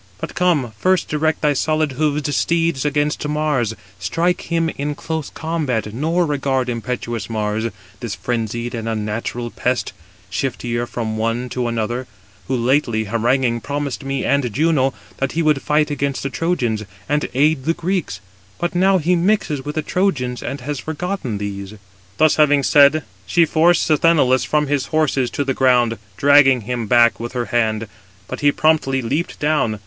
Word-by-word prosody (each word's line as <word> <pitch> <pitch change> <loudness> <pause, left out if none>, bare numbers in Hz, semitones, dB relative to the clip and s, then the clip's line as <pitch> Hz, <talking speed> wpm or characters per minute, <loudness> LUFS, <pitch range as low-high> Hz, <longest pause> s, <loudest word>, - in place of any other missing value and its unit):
But - - -5
come, 160 -10 +1
first 185 +3 +2
direct 155 +1 0
thy 150 -1 +3
solid 155 +1 0
hoofed 145 +1 -1
steeds 165 -4 +1
against 150 0 0
Mars, 150 -7 0 0.2
strike 165 - 0
him 165 -1 +1
in 145 +1 -3
close 160 -1 -4
combat, 140 -10 -2
nor 165 +8 +1
regard 135 -4 0
impetuous 120 -1 -4
Mars, 110 0 -1 0.3
this 115 -5 -4
frenzied 120 0 -3
and 115 -1 -3
unnatural 115 +2 -3
pest, 125 0 -1 0.4
shifter 120 -1 -2
from 110 -2 -3
one 115 +3 -1
to 125 0 -2
another; 120 +2 -2 0.4
who - - 0
lately 120 -2 +1
haranguing 115 +2 +1
promised 145 0 -3
me 135 0 -2
and 140 -4 +1
Juno, 140 0 +1 0.2
that 135 -1 -2
he 165 - 0
would 150 -3 +2
fight 150 0 +1
against 140 -1 -2
the 135 - -3
Trojans, 125 -12 -1 0.2
and 150 0 0
aid 145 0 +2
the 165 +1 +1
Greeks; 180 0 -2 0.4
but 175 - -2
now 190 +2 +4
he 180 +1 +2
mixes 170 -6 +1
with 150 +2 -5
the 155 - -1
Trojans, 140 -11 -1
and 140 - -5
has 145 +1 -4
forgotten 160 - -3
these." 100 0 -5 0.4
Thus 155 -1 +4
having 145 -2 +4
said, 145 +2 +5 0.2
she 170 -1 +4
forced 165 +2 +3
Sthenelus 150 -5 +3
from 150 -1 +1
his 145 -2 -1
horses 145 -5 +1
to 145 - -2
the 135 -1 -1
ground, 125 -3 +2 0.2
dragging 140 -1 +5
him 120 0 -3
back 120 +1 +4
with 120 +1 -5
her 120 -1 -1
hand; 110 -2 +1 0.4
but - - -6
he 145 0 +4
promptly 140 -4 +1
leaped 145 +9 -2
down. 145 -8 +1
135 Hz, 165 wpm, -20 LUFS, 120-155 Hz, 0.4 s, said